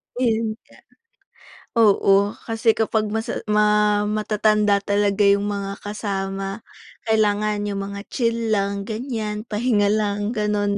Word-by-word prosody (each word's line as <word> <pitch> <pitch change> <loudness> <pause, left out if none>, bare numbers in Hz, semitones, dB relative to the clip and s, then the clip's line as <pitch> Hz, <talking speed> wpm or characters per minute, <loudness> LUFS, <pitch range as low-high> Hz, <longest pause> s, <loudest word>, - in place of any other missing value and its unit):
Yun 225 -3 0
nga, - - -21 1.0
oo, 200 -1 +4 0.2
kasi 225 0 +1
kapag 220 -1 0
masa 220 +2 -3
ma 210 0 +3
matatanda 210 -1 +2
talaga 205 0 +2
yung 200 +1 +3
mga 200 -1 -4
kasama 195 -1 -4 0.5
kailangan 210 -1 +1
yung 200 -1 -3
mga 200 0 -6
chill 230 -3 0
lang, 200 0 -1
ganiyan, 220 -2 -4
pahinga 210 -2 +1
lang, 205 0 0
gano'n, 210 -2 0
210 Hz, 115 wpm, -22 LUFS, 200-220 Hz, 1.0 s, oo